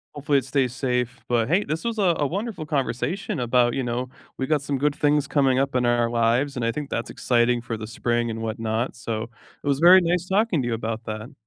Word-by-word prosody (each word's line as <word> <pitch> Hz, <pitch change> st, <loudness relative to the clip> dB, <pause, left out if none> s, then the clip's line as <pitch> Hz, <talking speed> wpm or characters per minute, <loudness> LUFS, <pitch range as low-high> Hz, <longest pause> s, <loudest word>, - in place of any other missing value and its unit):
hopefully 145 Hz, 0 st, +1 dB
it 135 Hz, -, -1 dB
stays 130 Hz, -2 st, 0 dB
safe, 125 Hz, -2 st, -1 dB
but 115 Hz, -2 st, +1 dB
hey, 185 Hz, +6 st, +3 dB
this 155 Hz, +2 st, -3 dB
was 230 Hz, -1 st, -2 dB
a 185 Hz, -5 st, +3 dB
a 145 Hz, -, +2 dB
wonderful 195 Hz, -, -4 dB
conversation 145 Hz, -, -2 dB
about, 120 Hz, 0 st, +2 dB
you 135 Hz, -, -1 dB
know, 125 Hz, +1 st, -3 dB, 0.3 s
we 130 Hz, -, -1 dB
got 150 Hz, -1 st, +1 dB
some 140 Hz, 0 st, -2 dB
good 145 Hz, +2 st, +1 dB
things 145 Hz, -1 st, +2 dB
coming 135 Hz, -3 st, +2 dB
up 135 Hz, -1 st, -1 dB
in 125 Hz, -1 st, +2 dB
our 120 Hz, -1 st, +2 dB
lives, 120 Hz, +4 st, +1 dB
and 125 Hz, -, -3 dB
I 115 Hz, -, +1 dB
think 145 Hz, +3 st, -5 dB
that's -, -, -3 dB
exciting 120 Hz, 0 st, +1 dB
for 115 Hz, -1 st, -5 dB
the 110 Hz, 0 st, -7 dB
spring 120 Hz, +1 st, -1 dB
and 115 Hz, 0 st, -4 dB
whatnot, 110 Hz, +1 st, -2 dB
so 115 Hz, -2 st, -4 dB, 0.4 s
it -, -, -6 dB
was 140 Hz, -1 st, +1 dB
very 180 Hz, +3 st, +8 dB
nice 175 Hz, +1 st, 0 dB
talking 195 Hz, -4 st, +2 dB
to 120 Hz, -, -3 dB
you 120 Hz, -, -1 dB
about 115 Hz, 0 st, -3 dB
that. 110 Hz, +1 st, -6 dB
130 Hz, 235 wpm, -24 LUFS, 120-150 Hz, 0.4 s, very